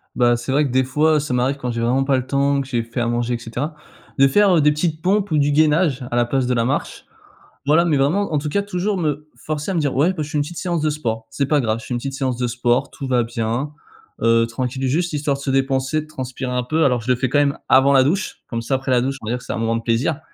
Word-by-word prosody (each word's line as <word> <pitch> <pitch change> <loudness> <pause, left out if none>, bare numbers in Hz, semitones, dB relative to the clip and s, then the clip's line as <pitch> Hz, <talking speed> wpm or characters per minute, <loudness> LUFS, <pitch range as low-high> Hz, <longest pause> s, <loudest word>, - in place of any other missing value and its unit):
Bah, 120 -1 +3
c'est 120 +2 -5
vrai 145 +3 +3
que 135 - -3
des 130 +1 +3
fois 150 +4 +2
ça 145 -3 -3
m'arrive 125 +3 +1
quand 125 -3 -4
j'ai 115 0 -3
vraiment 125 +3 +2
pas 135 -1 +2
le 125 - -3
temps, 140 +1 +1
que 135 - -7
j'ai 120 -3 -1
fait 115 +2 -6
à 120 - 0
manger, 120 +1 -1
et - - -3
cetera, 120 +7 -5 0.4
de 135 0 +6
faire, 195 +6 +4
heu, - - +4
des 150 +1 +4
petites 155 +1 -2
pompes 200 +3 +1
ou 155 - +2
du 145 0 +2
gainage 150 -2 +2
à - - -1
la 120 0 +3
place 130 +1 0
de 125 - +1
la 115 -1 +1
marche, 140 +4 -3 0.6
voilà, 160 +4 +4
mais 155 -4 +2
vraiment, 160 +7 +1
en - - +2
tout 150 +1 -4
cas, 200 +7 0
toujours 200 +1 -2
me 150 -3 -2
forcer 150 +3 -4
à - - -2
me - - +2
dire: 145 -3 -1
«Ouais, 150 +7 +3
bah 160 -4 -3
je 150 - -8
fais 155 - -1
une - - +2
petite 170 +3 -9
séance 175 -3 -1
de 155 - +1
sport, 115 -7 -3
c'est 110 +6 -1
pas 150 0 +2
grave, 110 -2 -1
je - - -11
fais - - -3
une 120 - -1
petite 135 +2 -5
séance 130 -3 -2
de 125 0 -1
sport, 120 +1 0
tout 140 - -6
va 125 -2 +2
bien», 115 +4 -2 0.5
heu, 115 0 +3
tranquille, 130 +2 -3
juste 170 +6 0
histoire 145 -1 -1
de - - -10
se 135 - -1
dépenser, 135 +2 0
de 155 - -12
transpirer 130 -3 -5
un 125 0 -1
peu, 155 +6 +1
alors 125 -3 +2
je 125 +3 -1
le - - +4
fais 130 +1 -1
quand 145 +3 +2
même 140 -1 +1
avant 135 +1 +5
la 135 -1 +6
douche, 185 +8 -1
comme 115 -1 -3
ça, 115 - -3
après, 130 0 -2
la 125 -1 +4
douche, 135 +2 -2
on 110 - -8
va - - -1
dire - - -1
que - - -15
c'est - - -4
un - - -3
moment 115 0 0
de 115 - -6
plaisir. 125 +7 0
135 Hz, 305 wpm, -20 LUFS, 125-150 Hz, 0.6 s, de